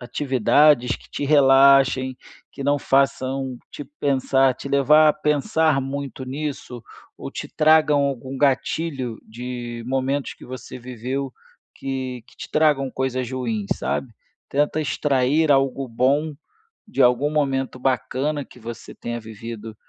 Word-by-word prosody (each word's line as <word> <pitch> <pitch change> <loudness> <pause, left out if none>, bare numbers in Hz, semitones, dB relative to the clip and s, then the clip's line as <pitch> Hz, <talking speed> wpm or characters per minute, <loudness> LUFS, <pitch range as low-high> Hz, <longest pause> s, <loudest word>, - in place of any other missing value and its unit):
atividades 130 0 +3
que - - -20
te 145 - -4
relaxem 135 -2 +5 0.3
que 140 - -8
não 145 +1 +2
façam 135 -1 0
te 145 - -8 0.2
pensar, 135 -1 +2
te 140 - -8
levar 150 +3 +5
a - - +5
pensar 150 0 +1
muito 135 -1 -5
nisso 135 -3 -5 0.3
ou - - -7
te - - -6
tragam 155 -2 +4
algum 135 -1 -3
gatilho 135 -2 0
de 120 0 -7
momentos 135 +2 -1
que - - -15
você 130 0 -8
viveu, 125 +2 -5 0.4
que 130 -3 -5
que 135 - -22
te - - -9
tragam 150 -4 +2
coisas 130 -1 -2
ruins, 115 -6 -3
sabe. 125 -4 -3 0.4
Tenta 145 +2 0
extrair 145 +1 +1
algo 135 -1 +1
bom 140 +6 +1 0.5
de 215 - -5
algum 125 +4 +4
momento 135 -4 -1
bacana 135 +3 -1
que - - -17
você 115 0 -9
tenha 120 0 -5
vivido 110 0 -8
135 Hz, 135 wpm, -22 LUFS, 125-145 Hz, 0.5 s, relaxem